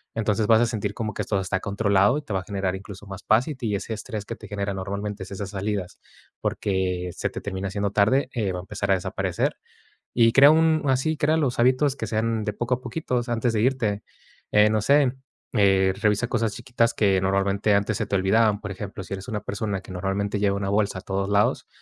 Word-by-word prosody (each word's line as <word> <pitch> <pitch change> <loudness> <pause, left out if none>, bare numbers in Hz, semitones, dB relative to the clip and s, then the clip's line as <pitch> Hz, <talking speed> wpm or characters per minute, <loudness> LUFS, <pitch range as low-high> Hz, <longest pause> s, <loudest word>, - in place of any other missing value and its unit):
Entonces, 110 -1 0
vas 110 +1 +6
a - - +4
sentir 110 -3 -2
como 110 0 -4
que - - -3
esto 105 - -2
se - - 0
está 95 0 -1
controlado 100 +3 +2
y - - -3
te 145 - -11
va 95 - +1
a - - -12
generar 95 -1 -2
incluso 100 +1 -10
más 95 +1 -8
paz 110 +3 +3
y 150 - -4
te 115 -5 -3
ese 105 +3 -4
estrés 110 -1 -5
que 115 - -5
te 110 - -11
genera 100 -1 -3
normalmente, 100 +1 -4
esas 100 +1 -6
salidas, 100 -2 -3 0.4
porque 90 -2 -1
se - - -2
te - - -7
termina 95 -1 -4
haciendo 100 +1 -2
tarde, 115 +7 +2
eh, 105 -6 -1
va 90 - -3
a - - -5
empezar 100 +1 -3
a - - +7
desaparecer 90 - -2 0.6
y 115 -1 +5
crea 140 +3 +8
un 160 0 +4
así, 135 +4 +1
crea 155 +2 +2
los 135 -7 0
hábitos 130 +3 +3
que - - -4
sean 110 0 0
de 105 - -1
poco 120 +4 -1
a 125 - -5
poquito. 125 +2 -3
O 120 - +1
sea, 120 0 -2
antes 115 +1 0
de 110 - 0
irte, 115 -5 0 0.5
eh, 105 0 +6
no 110 0 +2
sé, 140 +1 +4 0.4
eh, 95 -4 +4
revisa 105 +2 +2
cosas 115 -3 0
chiquitas 120 -3 0
que, 100 -3 +3
normalmente 100 +2 +1
antes 100 +1 0
se - - -1
te 100 - 0
olvidaban, 105 +2 +3
por 100 -2 -5
ejemplo, 100 0 -7
si - - -10
eres 95 +4 -8
una 105 -3 -2
persona 100 -1 -3
que 95 - -11
normalmente 100 +2 -2
lleva 100 -1 +2
una 100 -1 -2
bolsa 100 -2 +1
a - - -18
todos 95 0 -2
lados, 100 0 +1
105 Hz, 235 wpm, -24 LUFS, 100-115 Hz, 0.6 s, crea